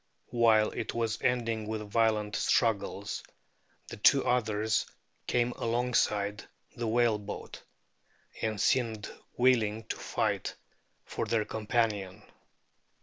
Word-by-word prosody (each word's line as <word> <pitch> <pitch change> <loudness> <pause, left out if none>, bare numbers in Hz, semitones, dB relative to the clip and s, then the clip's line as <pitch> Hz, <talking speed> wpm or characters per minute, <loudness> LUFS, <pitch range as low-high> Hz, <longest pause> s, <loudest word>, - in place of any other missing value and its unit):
While 115 -3 +4
it - - -4
was 115 -2 -1
ending 115 -3 0
with 110 -1 -4
violent 110 -2 +2
struggles 100 -2 0 0.7
the - - -8
two 135 +6 +5
others 110 -3 +1 0.4
came 120 0 +1
alongside 115 -4 0 0.3
the 120 -2 -3
whale 115 -1 +2
boat, 105 0 -8 0.8
and 110 -2 -1
seemed 115 -4 +1 0.3
willing 115 -4 +3
to - - -2
fight - - -2 0.5
for - - -3
their 110 -2 +1
companion. 105 -4 -1
110 Hz, 105 wpm, -30 LUFS, 105-120 Hz, 0.8 s, two